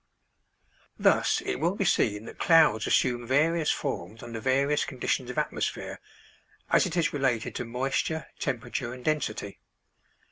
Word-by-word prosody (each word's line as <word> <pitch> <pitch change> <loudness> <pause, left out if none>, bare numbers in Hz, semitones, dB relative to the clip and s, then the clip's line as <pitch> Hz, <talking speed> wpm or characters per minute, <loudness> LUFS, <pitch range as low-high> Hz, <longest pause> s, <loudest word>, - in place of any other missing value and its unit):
Thus - - +3
it - - -2
will 170 +6 +1
be 200 - -1
seen 105 -8 +1
that - - -11
clouds 155 -10 +5
assume 120 -2 +1
various 155 +4 +2
forms 115 -5 -3
under 115 -1 -6
various 135 +4 +2
conditions 125 -1 -2
of 125 - -6
atmosphere, - - -2 0.7
as - - +4
it 180 0 -4
is 170 - +1
related 130 -6 0
to 125 - -3
moisture, 135 +6 -1
temperature, 125 -4 -3
and 125 - -13
density. 120 -10 -2
130 Hz, 140 wpm, -28 LUFS, 120-155 Hz, 0.7 s, clouds